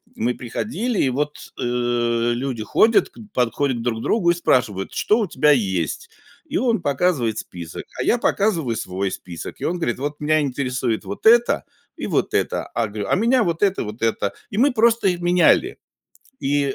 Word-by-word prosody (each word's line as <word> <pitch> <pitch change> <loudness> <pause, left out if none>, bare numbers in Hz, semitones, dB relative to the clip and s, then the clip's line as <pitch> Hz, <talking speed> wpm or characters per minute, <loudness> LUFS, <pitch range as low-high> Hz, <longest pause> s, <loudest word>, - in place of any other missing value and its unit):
мы 120 +3 0
приходили 215 - -3
и 135 - +2
вот, 150 +3 -2 0.2
э, - - -2
люди 120 0 0
ходят, 220 - +3 0.2
подходят 125 - 0
к 115 - -5
друг 115 -2 -2
другу 175 - +2
и - - +3
спрашивают: 110 - 0
"Что 215 - +2
у 215 - 0
тебя 150 -3 +3
есть?" 100 - 0 0.4
И 310 - -2
он 235 - +1
показывает 140 -6 0
список, 85 -2 -8 0.2
а - - 0
я 245 - +3
показываю 170 - +1
свой 95 -2 -3
список. 85 -3 -8
И - - -5
он 180 - -1
говорит: 130 -8 -2
"Вот 145 +1 -4
меня 155 +1 +2
интересует 125 -4 -2
вот 100 - -7
это 235 +1 +5 0.3
и - - -4
вот - - 0
это." - - 0
А 115 -2 0
говорю: 105 0 -5
"Меня 235 +4 +3
вот 170 0 -2
это 195 -1 +2
и - - -3
вот 105 +2 -8
это." 105 -3 0 0.2
И 200 - -6
мы 275 +5 +4
просто 230 -2 +3
их 180 -2 0
меняли 180 - +3 0.6
и 140 -1 0
140 Hz, 185 wpm, -21 LUFS, 115-190 Hz, 0.6 s, это